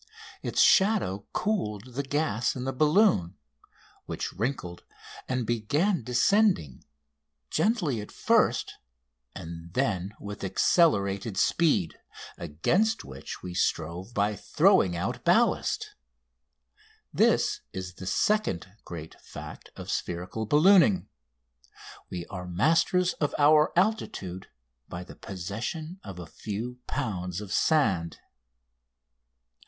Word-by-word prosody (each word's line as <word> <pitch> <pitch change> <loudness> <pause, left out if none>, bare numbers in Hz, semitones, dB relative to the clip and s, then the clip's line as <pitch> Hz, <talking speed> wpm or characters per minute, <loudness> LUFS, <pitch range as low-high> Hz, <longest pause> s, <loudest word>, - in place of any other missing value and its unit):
Its - - -2
shadow 190 - +4
cooled 125 - -2
the 135 - -1
gas 140 -5 -1
in 125 - -4
the 135 +1 -2
balloon, 150 - +3 0.7
which - - -4
wrinkled 95 -5 -3 0.5
and 130 -2 -1
began 145 - +1
descending, 125 - +2 0.7
gently 175 - +1
at 105 - -10
first, - - +1 0.6
and 85 +1 -9
then 100 -6 -1
with 100 0 -7
accelerated 100 - +2
speed, 125 - +2 0.4
against 170 - 0
which 65 0 -9
we 90 - -6
strove 85 +4 -1
by 105 +1 +1
throwing 90 -2 +3
out 85 - -3
ballast. - - +2 1.2
This - - +3
is 95 -1 -6
the 95 +1 -9
second 100 - 0
great 80 -2 -9
fact - - -10
of - - -6
spherical 90 +5 -3
ballooning 185 - +5 1.0
we 85 -1 -5
are 90 -1 -7
masters 165 - +2
of 150 - 0
our 150 +1 +5
altitude 175 - -1 0.4
by 85 - -6
the - - -12
possession 115 - -5
of 95 - -8
a 90 - -7
few 110 +9 -6
pounds 95 -9 -3
of 105 -2 -6
sand! 95 - +2
110 Hz, 105 wpm, -27 LUFS, -, 1.2 s, ballooning